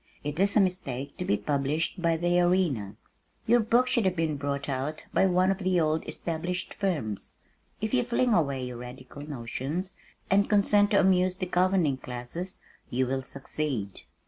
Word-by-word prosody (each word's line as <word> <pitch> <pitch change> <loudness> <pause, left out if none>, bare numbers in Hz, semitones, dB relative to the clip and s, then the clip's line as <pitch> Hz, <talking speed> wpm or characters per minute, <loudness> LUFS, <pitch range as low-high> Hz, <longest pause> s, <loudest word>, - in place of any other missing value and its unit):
"It 150 +2 -4
is 200 +2 +3
a - - +7
mistake 140 -8 -1
to 180 - -3
be 105 - +2
published 145 - -1
by 165 -1 +2
the 175 +1 +2
Arena. 175 - +1 0.5
Your 240 +2 +5
book 235 +3 +3
should 240 -4 +2
have 185 -1 +2
been 160 -3 0
brought 140 0 -3
out 140 +3 -3
by 190 - +4
one 185 +1 +3
of 195 - -2
the 185 -2 +2
old 155 0 +1
established 175 +2 -3
firms. 150 - -2 0.5
If 220 +2 -2
you 255 - +4
will 240 - -7
fling 245 0 +2
away 140 -8 +1
your 125 -1 -6
radical 125 +3 -10
notions 145 +6 -4 0.3
and 200 +1 +3
consent 205 0 +4
to 200 - +4
amuse 185 -1 +3
the 185 0 -3
governing 180 -5 +2
classes, 130 +10 -6 0.3
you 130 +2 +1
will 135 +1 -1
succeed." 130 -5 -4
170 Hz, 175 wpm, -28 LUFS, 135-190 Hz, 0.5 s, a